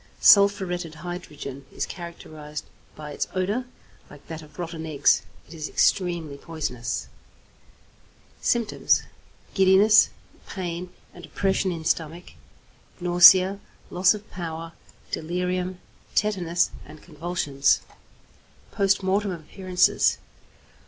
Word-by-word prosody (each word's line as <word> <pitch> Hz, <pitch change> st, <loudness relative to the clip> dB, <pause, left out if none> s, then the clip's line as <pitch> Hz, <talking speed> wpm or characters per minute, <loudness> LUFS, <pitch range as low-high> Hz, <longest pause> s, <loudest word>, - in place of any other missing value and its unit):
=Sulphuretted 190 Hz, -5 st, +4 dB
Hydrogen= 155 Hz, -5 st, -7 dB
is -, -, -3 dB
characterized 155 Hz, -4 st, -8 dB, 0.3 s
by 150 Hz, -1 st, -8 dB
its -, -, -3 dB
odour, 205 Hz, +7 st, -1 dB, 0.4 s
like 145 Hz, -1 st, -15 dB
that 160 Hz, -1 st, -6 dB
of 150 Hz, -1 st, -16 dB
rotten 165 Hz, -2 st, -5 dB
eggs. 145 Hz, -10 st, +3 dB, 0.3 s
It -, -, -13 dB
is 155 Hz, -2 st, -5 dB
extremely 170 Hz, -6 st, 0 dB
poisonous. 125 Hz, -, -4 dB, 1.3 s
Symptoms. 235 Hz, -3 st, +1 dB, 0.5 s
Giddiness, 195 Hz, +3 st, +6 dB, 0.4 s
pain 180 Hz, -1 st, -5 dB, 0.2 s
and 175 Hz, -, -13 dB
oppression 190 Hz, -1 st, 0 dB
in 165 Hz, -2 st, -6 dB
stomach, 165 Hz, +2 st, -2 dB, 0.7 s
nausea, 185 Hz, +2 st, +7 dB, 0.3 s
loss 185 Hz, +3 st, +4 dB
of 210 Hz, 0 st, -11 dB
power; 165 Hz, -2 st, -6 dB, 0.4 s
delirium, 180 Hz, +2 st, -2 dB, 0.4 s
tetanus, 180 Hz, -5 st, +1 dB
and 155 Hz, -, -14 dB
convulsions. 150 Hz, -4 st, 0 dB, 0.9 s
_Post 195 Hz, 0 st, +2 dB
Mortem 200 Hz, +2 st, +1 dB
Appearances. 180 Hz, +2 st, +1 dB
175 Hz, 100 wpm, -25 LUFS, 155-190 Hz, 1.3 s, nausea